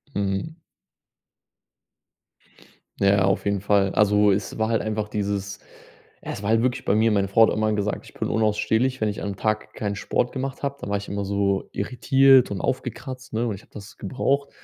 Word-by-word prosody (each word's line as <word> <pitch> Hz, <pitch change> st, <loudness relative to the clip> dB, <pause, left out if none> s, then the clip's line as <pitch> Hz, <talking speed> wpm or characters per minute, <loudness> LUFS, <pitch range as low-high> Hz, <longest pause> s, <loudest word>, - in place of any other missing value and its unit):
Mhm. 100 Hz, -, -2 dB, 2.4 s
Ja, 100 Hz, -1 st, +4 dB
auf 95 Hz, +1 st, 0 dB
jeden 100 Hz, -1 st, 0 dB
Fall. 100 Hz, -1 st, +2 dB
Also, 105 Hz, 0 st, +4 dB
es 100 Hz, +3 st, -2 dB
war 110 Hz, 0 st, 0 dB
halt 115 Hz, -, +1 dB
einfach 105 Hz, -1 st, -2 dB
dieses 100 Hz, -1 st, -3 dB, 0.6 s
es -, -, -6 dB
war 100 Hz, -, -2 dB
halt 115 Hz, +1 st, +3 dB
wirklich 125 Hz, -1 st, 0 dB
bei 100 Hz, -, +1 dB
mir 110 Hz, +1 st, +3 dB
meine 100 Hz, -2 st, +2 dB
Frau 110 Hz, +4 st, +6 dB
hat -, -, 0 dB
immer 110 Hz, 0 st, +1 dB
gesagt: 105 Hz, 0 st, -2 dB
„Ich -, -, -15 dB
bin -, -, -2 dB
unausstehlich, 110 Hz, +4 st, +1 dB
wenn 110 Hz, -, +2 dB
ich 105 Hz, -, -5 dB
am 100 Hz, -1 st, -3 dB
Tag 110 Hz, +1 st, -2 dB
keinen 100 Hz, -1 st, -3 dB
Sport 120 Hz, +4 st, -1 dB
gemacht 135 Hz, +1 st, -5 dB
habe.“ 140 Hz, 0 st, -2 dB
Da -, -, -5 dB
war 100 Hz, -, +1 dB
ich 100 Hz, -, -7 dB
immer 100 Hz, 0 st, -3 dB
so 100 Hz, 0 st, 0 dB
irritiert 135 Hz, +4 st, +4 dB
und 100 Hz, -, -4 dB
aufgekratzt, 130 Hz, 0 st, -4 dB
ne, 115 Hz, +2 st, 0 dB
und 110 Hz, -, -1 dB
ich 100 Hz, -, -9 dB
habe -, -, -25 dB
das 100 Hz, 0 st, -11 dB
gebraucht. 135 Hz, +6 st, -1 dB
105 Hz, 195 wpm, -24 LUFS, 100-120 Hz, 2.4 s, Frau